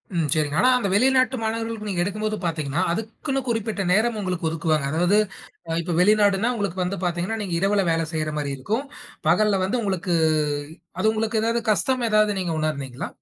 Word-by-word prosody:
ம், 165 -3 +1
சரிங்க. 150 -2 0
ஆனா 255 - +5
அந்த 235 - -1
வெளிநாட்டு 255 +4 +3
மாணவர்களுக்கு 225 -1 -3
நீங்க 175 -3 -1
எடுக்கும்போது 215 +2 -2
பாத்தீங்கன்னா 160 -1 -1
அதுக்குன்னு 225 - -3
குறிப்பிட்ட 225 -3 -1
நேரம் 220 +4 +2
ஒங்களுக்கு 180 -4 -2
ஒதுக்குவாங்க. 155 -3 0
அதாவது 175 +6 +3 0.5
அ - - -2
இப்ப 175 +1 -3
வெளிநாடுன்னா 205 +2 +4
உங்களுக்கு 200 -4 -3
வந்து 185 +2 -2
பாத்தீங்கன்னா, 175 +5 -1
நீங்க 190 -4 -4
இரவுல 200 +2 +2
வேல 165 0 +1
செய்யுற 155 -1 -2
மாரி 145 -2 -2
இருக்கும். 220 - -2 0.4
பகல்ல 200 +3 +3
வந்து 215 +7 0
உங்களுக்கு 190 -3 -1 0.9
அது 220 +3 +3
உங்களுக்கு 220 0 0
ஏதாவது 230 +1 +1
கஷ்டம் 255 +4 +1
ஏதாவது 215 0 +4
நீங்க 175 -3 -2
உணர்தீங்களா? 140 -5 -3
200 Hz, 170 wpm, -23 LUFS, 170-220 Hz, 0.9 s, ஆனா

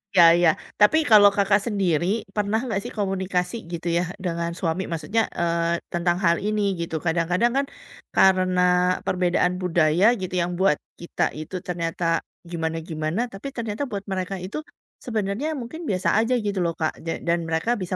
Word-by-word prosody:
Iya 175 - +8 0.2
iya. 175 -2 +5 0.3
Tapi 210 +10 +6
kalau 205 -2 +8
Kakak 200 0 +3
sendiri 195 0 0
pernah 210 +1 +1
nggak 220 -6 -1
sih - - -6
komunikasi 190 -1 -1 0.2
gitu 170 0 -5
ya 175 - +2 0.2
dengan 170 -1 -2
suami 170 +2 -1
maksudnya, 200 +7 0 0.2
eee, 170 0 0
tentang 175 0 +1
hal 170 0 +4
ini 210 +1 -1 0.2
gitu 165 -1 -4
kadang-kadang 175 +7 +1
kan, 275 - +2 0.5
karena 185 -1 +4 0.4
perbedaan 180 0 +1
budaya 170 0 +2 0.2
gitu 185 - -5
yang 175 +1 -1
buat 190 -6 +3 0.2
kita 170 - -2 0.2
itu 155 +4 -7
ternyata 170 -1 -3 0.5
gimana-gimana 160 +1 -3
tapi 195 +8 -7
ternyata 225 +1 -3
buat 200 -1 -4
mereka 185 +1 -2
itu, 190 - -6 0.5
sebenarnya 220 +4 -2
mungkin 250 +8 -7
biasa 185 -2 0
aja 230 +3 +1
gitu 200 -2 -1
loh, 170 -1 0
Kak 160 -1 0
ja 165 - -1
dan 170 0 +2
mereka 160 +7 -1
bisa 185 0 -3
180 Hz, 160 wpm, -24 LUFS, 170-205 Hz, 0.5 s, Iya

